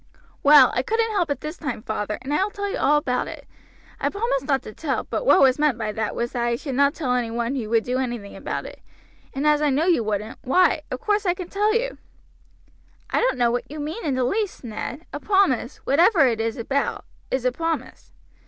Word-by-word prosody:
"Well, 285 Hz, -3 st, +7 dB
I 250 Hz, -, +1 dB
couldn't 450 Hz, -, 0 dB
help 365 Hz, -6 st, 0 dB
it 285 Hz, -3 st, -2 dB
this 305 Hz, +3 st, -6 dB
time, 265 Hz, -8 st, -5 dB
father, 210 Hz, -2 st, -3 dB
and 275 Hz, +3 st, -3 dB
I 340 Hz, -, +3 dB
will 405 Hz, -, -1 dB
tell 405 Hz, 0 st, -4 dB
you 395 Hz, -, -3 dB
all 295 Hz, +2 st, +4 dB
about 250 Hz, -4 st, -1 dB
it. -, -, -9 dB, 0.5 s
I -, -, 0 dB
promised 400 Hz, -, -1 dB
not 270 Hz, -2 st, +1 dB
to 215 Hz, -, -9 dB
tell; 285 Hz, 0 st, -2 dB
but -, -, -4 dB
what 375 Hz, -, +6 dB
was 265 Hz, 0 st, +5 dB
meant 295 Hz, -5 st, +2 dB
by 215 Hz, -2 st, -2 dB
that 220 Hz, 0 st, -3 dB
was 235 Hz, 0 st, -2 dB
that 240 Hz, -, -3 dB
I 235 Hz, 0 st, +1 dB
should 270 Hz, +3 st, -5 dB
not 280 Hz, +3 st, +3 dB
tell 260 Hz, -6 st, -1 dB
any 245 Hz, -2 st, 0 dB
one 235 Hz, +2 st, -2 dB
who 240 Hz, -6 st, -3 dB
would 225 Hz, -1 st, +2 dB
do 250 Hz, +1 st, -1 dB
anything 240 Hz, -6 st, -4 dB
about -, -, -4 dB
it; -, -, -10 dB, 0.5 s
and 275 Hz, +2 st, -3 dB
as 300 Hz, 0 st, +4 dB
I 300 Hz, -, +3 dB
know 285 Hz, +4 st, +1 dB
you 340 Hz, -10 st, +3 dB
won't, 215 Hz, +1 st, -3 dB
why, 335 Hz, +3 st, +3 dB
of 255 Hz, -, -5 dB
course 420 Hz, -1 st, 0 dB
I 350 Hz, -, +2 dB
can 360 Hz, -1 st, -7 dB
tell 420 Hz, +2 st, +1 dB
you." -, -, -1 dB, 1.1 s
"I -, -, +2 dB
don't -, -, +1 dB
know 240 Hz, -1 st, +3 dB
what 245 Hz, -, -3 dB
you 300 Hz, +2 st, -7 dB
mean 310 Hz, +10 st, -5 dB
in 285 Hz, -5 st, 0 dB
the 255 Hz, -, +1 dB
least, 405 Hz, -, -1 dB
Ned; 240 Hz, +8 st, -6 dB
a -, -, -4 dB
promise, 385 Hz, -, +1 dB
whatever 330 Hz, +2 st, +5 dB
it 230 Hz, -3 st, +1 dB
is 225 Hz, 0 st, -2 dB
about, 275 Hz, +4 st, -2 dB, 0.2 s
is 260 Hz, -1 st, -1 dB
a 250 Hz, -, +3 dB
promise." 325 Hz, +3 st, -4 dB
275 Hz, 235 wpm, -23 LUFS, 240-345 Hz, 1.1 s, Well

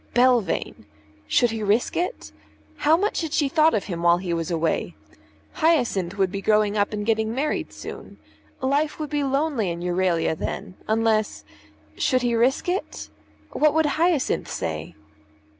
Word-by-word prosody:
Belvane! 245 Hz, -, +1 dB, 0.4 s
Should 240 Hz, -, +3 dB
he 225 Hz, -1 st, -4 dB
risk 210 Hz, +3 st, +1 dB
it? 360 Hz, +8 st, -3 dB, 0.5 s
How 310 Hz, +2 st, +4 dB
much 405 Hz, +2 st, 0 dB
had 320 Hz, -2 st, -4 dB
she 295 Hz, -, +2 dB
thought 310 Hz, +1 st, +3 dB
of 205 Hz, -, 0 dB
him 170 Hz, -4 st, -5 dB
while 170 Hz, 0 st, +4 dB
he 175 Hz, -1 st, -3 dB
was 165 Hz, -1 st, -2 dB
away? 160 Hz, -, -1 dB, 0.6 s
Hyacinth 215 Hz, -, +1 dB
would 190 Hz, -2 st, +1 dB
be 195 Hz, -, -4 dB
growing 210 Hz, 0 st, +2 dB
up 205 Hz, -1 st, +1 dB
and 210 Hz, -1 st, -3 dB
getting 220 Hz, 0 st, 0 dB
married 295 Hz, +3 st, -2 dB
soon. -, -, -9 dB, 0.4 s
Life 285 Hz, +3 st, 0 dB
would 305 Hz, -1 st, -4 dB
be 295 Hz, -1 st, 0 dB
lonely 275 Hz, -, 0 dB
in 170 Hz, 0 st, -4 dB
Euralia 175 Hz, -2 st, 0 dB
then, 180 Hz, -, -5 dB
unless 220 Hz, -1 st, 0 dB, 0.5 s
Should 255 Hz, -3 st, +1 dB
he 240 Hz, -1 st, +1 dB
risk 245 Hz, +7 st, +2 dB
it? 365 Hz, +3 st, -3 dB, 0.4 s
What 305 Hz, 0 st, +2 dB
would 320 Hz, 0 st, +3 dB
Hyacinth 310 Hz, 0 st, +1 dB
say? 80 Hz, 0 st, -4 dB
225 Hz, 160 wpm, -24 LUFS, 185-295 Hz, 0.6 s, How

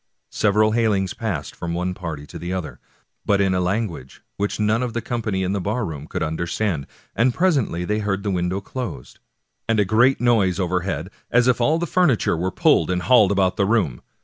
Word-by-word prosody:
Sev 105 Hz, -2 st, +1 dB
eral 110 Hz, 0 st, +4 dB
bailings 105 Hz, -5 st, +1 dB
passed -, -, -4 dB
from 85 Hz, 0 st, -4 dB
one 90 Hz, +1 st, -1 dB
party 80 Hz, -5 st, -6 dB
to -, -, -10 dB
the 85 Hz, +1 st, -5 dB
other, 80 Hz, -9 st, -4 dB, 0.4 s
but 100 Hz, -2 st, +2 dB
in 95 Hz, -1 st, +2 dB
a 90 Hz, -, +1 dB
language 90 Hz, -, -3 dB
which 100 Hz, +1 st, -2 dB
none 105 Hz, +2 st, +2 dB
of 125 Hz, -2 st, -2 dB
the 120 Hz, -, -1 dB
company 110 Hz, -5 st, -2 dB
in 95 Hz, -, -1 dB
the 100 Hz, -, -1 dB
barroom 90 Hz, -, -3 dB
could -, -, -3 dB
understand, 85 Hz, 0 st, -2 dB, 0.3 s
and 120 Hz, +1 st, +2 dB
presently 140 Hz, -, +1 dB
they 105 Hz, +3 st, 0 dB
heard 100 Hz, -2 st, -2 dB
the 100 Hz, -, -1 dB
window 90 Hz, +1 st, -1 dB
closed, 100 Hz, -, -7 dB, 0.5 s
and 115 Hz, -1 st, +2 dB
a 105 Hz, -, +3 dB
great 120 Hz, +7 st, +3 dB
noise 105 Hz, -7 st, +2 dB
overhead, 90 Hz, -2 st, -2 dB, 0.2 s
as 125 Hz, +1 st, +3 dB
if 125 Hz, -1 st, +2 dB
all 155 Hz, +7 st, +3 dB
the 170 Hz, -, -1 dB
furniture 155 Hz, -, +2 dB
were 90 Hz, +3 st, -1 dB
pulled 90 Hz, -, +3 dB
and 90 Hz, -1 st, -1 dB
hauled 110 Hz, -6 st, +5 dB
about 95 Hz, -1 st, +1 dB
the 100 Hz, -, +2 dB
room. 95 Hz, -, +1 dB
100 Hz, 200 wpm, -22 LUFS, 90-115 Hz, 0.5 s, hauled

